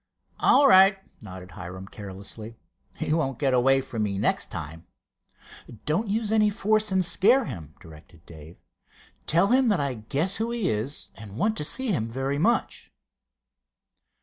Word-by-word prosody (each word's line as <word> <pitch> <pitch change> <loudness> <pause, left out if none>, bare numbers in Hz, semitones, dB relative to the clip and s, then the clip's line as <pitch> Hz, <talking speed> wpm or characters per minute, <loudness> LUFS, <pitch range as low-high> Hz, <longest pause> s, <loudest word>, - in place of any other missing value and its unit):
"All 285 - +5
right," 195 -3 +7 0.2
nodded 95 -3 -10
Hiram, 90 +3 -9
carelessly. 105 +3 -9 0.4
"He - - -2
won't 135 -6 -1
get 135 -3 0
away 135 +2 +3
from 120 -4 -5
me 100 -2 -1
next - - 0
time." 80 +2 -8 1.0
"Don't 175 +9 0
use 215 +1 -1
any 215 -1 +4
force 215 0 +1
and 190 -1 +2
scare 235 +9 +3
him," 80 - -8
directed 80 +1 -16
Dave. 80 +1 -13 0.7
"Tell 170 +5 +3
him 255 +1 +3
that 205 -5 +2
I 140 -2 -1
guess 140 - -2
who 225 +1 -2
he 235 -4 -2
is, 110 +7 -3
and 110 -2 -11
want 215 - +1
to - - -1
see 260 - 0
him 115 - -1
very 135 +4 -2
much." - - 0
135 Hz, 155 wpm, -25 LUFS, -, 1.0 s, right